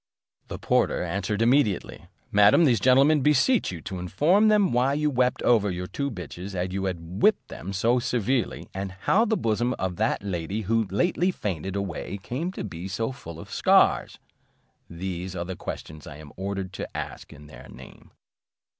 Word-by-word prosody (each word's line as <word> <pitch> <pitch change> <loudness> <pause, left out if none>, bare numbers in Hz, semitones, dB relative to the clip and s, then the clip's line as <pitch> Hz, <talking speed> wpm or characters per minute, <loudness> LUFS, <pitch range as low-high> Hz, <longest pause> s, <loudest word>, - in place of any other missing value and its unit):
The - - -6
porter - - +1
answered 100 +3 -1
immediately, 120 -6 +1 0.2
"Madam, 105 +11 +6
these 120 -7 +3
gentlemen 135 +6 +5
beseech 150 - +3
you 85 -3 -7
to 95 +2 -6
inform 155 - +3
them 210 - +3
why 125 +3 +2
you 150 0 +1
wept 125 -1 +1
over 110 -4 +3
your 90 0 -4
two 140 +9 -3
bitches 90 - -7
after 90 +1 -2
you 95 0 -2
had 90 +1 -5
whipped 215 - +3
them 95 - -7
so 115 +6 +2
severely, 125 0 -1
and 95 0 -5
how 195 - +2
the 220 -1 +1
bosom 115 +3 0
of 90 -2 -3
that 110 -1 0
lady 95 +2 -3
who 110 +2 +1
lately 175 - +1
fainted 95 - -4
away 100 0 -4
came 145 - -3
to - - -5
be 90 -3 -6
so 115 +6 -2
full 85 -10 -10
of - - -11
scars? - - +3 0.7
These 90 +1 -5
are 85 -1 -3
the 95 +1 -5
questions 80 -3 -8
I 75 - -9
am 75 -2 -12
ordered 95 0 -4
to - - -6
ask - - -7
in 75 - -13
their 75 - -13
name." 65 +2 -14
100 Hz, 180 wpm, -25 LUFS, 90-130 Hz, 0.7 s, Madam